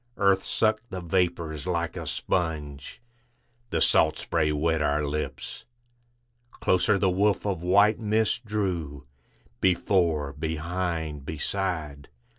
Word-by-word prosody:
Earth 100 -1 +3
sucked 110 +1 0
the 95 - -5
vapors 85 -3 -1
like 85 -2 -1
a - - -5
sponge, 75 -6 -3 0.7
The 85 - 0
salt - - +4
spray 80 -2 0
wet 80 +2 +1
our 75 0 +1
lips. 75 +2 -4 0.9
Closer 95 -2 +2
the 95 -1 +2
woof 100 +3 +1
of 95 -5 -1
white 100 +4 +4
mist 110 +2 +1
drew, 90 - -3 0.5
Before, 85 -6 +2
behind, 80 -1 -3
beside. 80 -2 -3
85 Hz, 110 wpm, -27 LUFS, 75-95 Hz, 0.9 s, salt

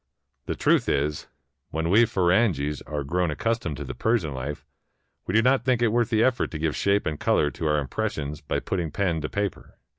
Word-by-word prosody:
The - - -2
truth - - +2
is, 75 +2 -1 0.4
when 80 +2 -1
we 115 +4 +6
Firangis 90 - +1
are 75 -2 -3
grown 90 +5 0
accustomed 85 - -2
to 75 - -5
the 65 - -6
Persian 110 - 0
life, 70 +3 -5 0.6
w^e 90 - 0
do 115 - +5
not 130 +2 +3
think 125 -2 +2
it 115 - +4
worth 120 +1 +1
the 110 -2 +3
effort 130 -1 +1
to 80 - -5
give 80 -1 -1
shape 100 +1 +1
and 75 -1 -2
color 75 - +2
to 80 - -3
our 75 0 +2
impressions 75 +1 -3
by - - -2
putting 90 -4 -2
pen 85 -1 -1
to 75 - -3
paper. 100 -1 -4
85 Hz, 205 wpm, -25 LUFS, 75-110 Hz, 0.6 s, we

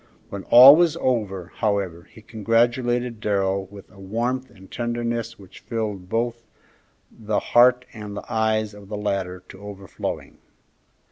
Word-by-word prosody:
When 100 -1 -7
all 130 +4 +10
was 170 -1 +2
over, 100 -8 -2
however, 95 -5 -2
he 110 - -16
congratulated 120 +2 0
Darrell 100 -2 -1
with 100 0 -14
a 100 - -17
warmth 120 +7 -3
and 95 0 -17
tenderness 120 -1 -3
which 95 -2 -15
filled 105 -5 -5
both 115 +1 -2 0.7
the 110 -2 -2
heart 125 +1 +4
and 105 -2 -8
the - - -7
eyes 110 -1 0
of 100 -1 -14
the 105 - -4
latter 95 -3 -3
to 95 - -12
overflowing. 100 -2 -7
110 Hz, 140 wpm, -23 LUFS, 100-120 Hz, 0.7 s, all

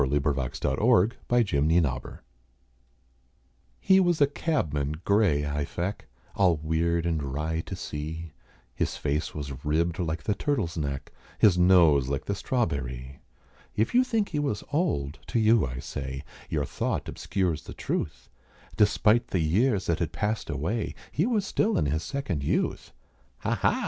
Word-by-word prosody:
[Illustration: 70 -1 0
A - - -2
Ward 100 +6 +4
in 120 - +3
the 120 - +6 0.4
Chancerie] 65 -6 -2 1.6
He 190 0 +5
WAS 175 -3 +2
a 145 - +7
cabman 75 - -1
grey 100 -9 +3
I 75 0 -1
feck, 90 +7 -4 0.3
All 90 -5 +4
weird 80 +2 0
and 80 -3 0
wry 75 +4 -2
to - - -6
see; 80 +2 -6 0.4
His - - -2
face 75 +1 -2
was 70 -3 -6
ribbed 80 +3 0
like 80 -2 -2
the 105 - +1
turtle's 105 - -1
neck, 70 -4 -3 0.3
His 100 -5 +5
nose 85 -7 +5
like 70 +1 -2
the 100 - -1
strawberrie. 70 - -2 0.6
If 110 - +1
you 250 +1 +6
think 225 -5 0
he 150 - -1
was 140 -8 -1
old, 80 - 0
to 115 - 0
you 110 - +4
I 60 0 -6
say, 65 +1 -5 0.3
Your - - 0
thought - - -2
obscures 90 -6 -2
the - - -9
truth - - -3 0.5
Despite 110 +3 +3
the - - -1
years 95 +6 +2
that 85 - 0
had 85 -3 -1
passed 105 +4 -2
away, 80 - -2 0.2
He 170 +8 +1
was 220 -5 +1
still 210 +3 +1
in - - +2
his 75 +3 0
second 100 - -3
youth. - - -1 0.5
"Ha! - - 0
ha!" - - +1
85 Hz, 160 wpm, -27 LUFS, 75-110 Hz, 1.6 s, a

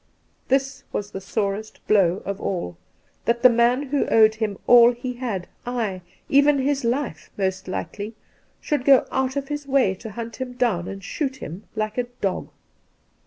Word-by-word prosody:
This 270 +1 0
was 205 0 -3
the 195 - -6
sorest 205 +1 -3
blow 195 -3 +3
of 200 0 -4
aU, 170 - -3 0.5
that 235 +1 +1
the 255 - +9
man 240 +3 +3
who 285 0 +1
owed 220 -1 +6
him 215 -3 -2
all 240 0 +8
he 250 +1 -5
had 235 -8 -4
— - - -39
ay, 220 -7 -2 0.3
even 285 +1 +5
his 275 0 0
life 240 - -2
most 190 -1 -1
likely! 205 +3 -5 0.2
— - - -38
should 295 -4 -1
go 270 -1 +6
out 265 0 0
of 275 -1 -3
his 295 -1 -4
way 265 -8 +3
to 195 +4 -9
hunt 230 +2 -7
him 260 -1 -5
down 225 -9 0
and 195 0 -7
shoot 265 - -2
him 200 -5 -8
like 215 +2 -2
a 245 - +1
dog. 195 -2 -2
235 Hz, 180 wpm, -23 LUFS, 200-260 Hz, 0.5 s, the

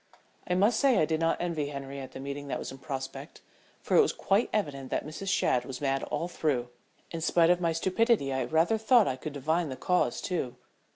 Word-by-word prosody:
I 180 - +1
must 210 +5 +3
say 270 -5 +4
I 155 - +4
did 160 0 -1
not 165 0 +1
envy 165 -4 -2
Henriette 140 -2 -7
the - - -7
meeting 140 +1 -6
that - - -2
was - - -6
in 135 - -10
prospect, 135 +2 -6 0.4
for - - 0
it - - +8
was 425 - +1
quite 200 +4 +1
evident 140 -10 -2
that - - -2
Mrs. 155 +6 -7
Shadd 125 -9 +2
was 130 0 -7
mad 135 -1 0
all 170 - -2
through. 140 -8 -1 0.4
In 165 - -4
spite 165 +1 +4
of 180 0 +2
my 170 -1 +2
stupidity 185 - +1
I 130 -1 0
rather 165 - +2
thought 225 0 +5
I 130 - 0
could 145 +3 -7
divine 160 +4 0
the 130 - -4
cause 180 +6 +1
too. 145 -9 -3
155 Hz, 220 wpm, -29 LUFS, 135-180 Hz, 0.4 s, it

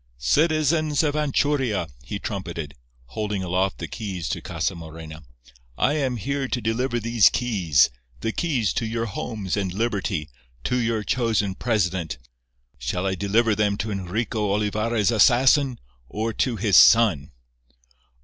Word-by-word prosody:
"Citizens 155 - +2
of 150 -2 +1
Anchuria," 140 - 0 0.2
he 100 - -5
trumpeted, 85 -8 -5 0.4
holding 105 - -3
aloft 95 +2 0
the - - -5
keys 95 -7 -5
to - - -3
Casa - - -2
Morena, 80 -1 -9 0.6
"I 145 - +2
am 135 -5 -1
here 140 +4 -2
to 130 - -2
deliver 120 +2 -1
these 115 -1 +4
keys—the 75 - 0
keys 130 - 0
to 115 - -2
your 115 +1 -2
homes 105 -2 -4
and 100 -3 -2
liberty—to 75 - -3
your 115 -2 0
chosen 110 -5 0
president. 95 - -1 0.6
Shall 65 +10 -2
I 95 - 0
deliver 105 +4 +2
them 105 -1 +1
to 110 +1 -3
Enrico 105 +2 -2
Olivarra's 105 +1 0
assassin, 125 +3 +4 0.3
or 110 +2 -2
to 125 +1 0
his 100 -4 +3
son?" 110 - +5
105 Hz, 130 wpm, -24 LUFS, 95-120 Hz, 0.6 s, son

